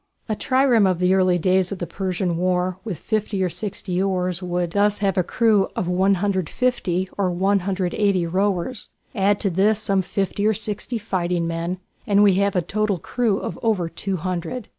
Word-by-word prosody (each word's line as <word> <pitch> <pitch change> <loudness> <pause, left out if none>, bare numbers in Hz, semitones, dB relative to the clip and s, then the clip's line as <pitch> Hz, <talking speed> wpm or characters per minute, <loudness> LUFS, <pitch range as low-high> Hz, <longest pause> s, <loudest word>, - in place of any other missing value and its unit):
A 215 - -1
trireme 255 -4 +3
of 185 - 0
the 185 0 +3
days 185 +2 +2
of 200 - -3
the 175 - -3
Persian 180 0 -2
War 180 +1 0
with 205 -7 -4
fifty 210 -1 -1
or 180 - +1
sixty 190 -1 -3
oars 185 -2 -1
would 175 -1 -2
thus 205 +2 +2
have 195 -2 0
a 185 - +3
crew 210 +1 +2
of 180 - -2
150 190 +1 0
or 190 -2 +2
180 190 0 +1
rowers. 195 +5 -1 0.2
Add 200 -1 +2
to 195 - +1
this 200 +5 +3
some 200 -2 +1
fifty 200 +2 -1
or 220 - +2
sixty 215 +3 -3
fighting 180 -5 -1
men 170 +2 -2 0.3
and 205 0 +4
we 200 -2 +6
have 200 -1 +1
a 180 - +2
total 215 +1 0
crew 220 +4 0
of - - -5
over 210 -7 +1
two 190 +3 -3
hundred. 185 +6 -4
190 Hz, 175 wpm, -22 LUFS, 180-205 Hz, 0.3 s, we